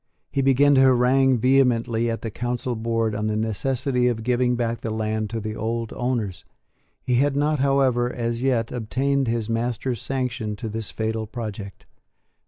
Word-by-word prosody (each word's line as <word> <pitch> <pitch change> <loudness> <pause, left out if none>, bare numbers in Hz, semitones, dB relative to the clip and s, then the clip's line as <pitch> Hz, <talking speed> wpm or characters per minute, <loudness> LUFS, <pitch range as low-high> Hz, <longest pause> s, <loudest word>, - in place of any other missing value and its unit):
He 135 - 0
began 135 +2 +4
to 135 - +5
harangue 130 0 +4
vehemently 120 -2 +2
at 115 - -3
the 115 - -3
Council 120 +2 -3
board 115 -1 -1
on 105 +1 -2
the 110 - -1
necessity 125 +4 0
of 115 -2 -1
giving 125 +1 +1
back 115 -1 -2
the 115 - -3
land 110 -1 -2
to 115 +1 -3
the 110 0 -5
old 115 +1 -3
owners. 120 -7 -2 0.6
He 125 -1 +1
had 140 +2 +2
not, 150 +1 +1
however, 130 -3 +2
as 115 -1 -3
yet, 125 -4 +1
obtained 135 +3 0
his 115 -2 -1
master's 120 +1 -2
sanction 125 -5 -3
to 110 +2 -5
this 110 0 -4
fatal 110 0 -3
project. 105 -4 -7
120 Hz, 170 wpm, -23 LUFS, 110-130 Hz, 0.6 s, to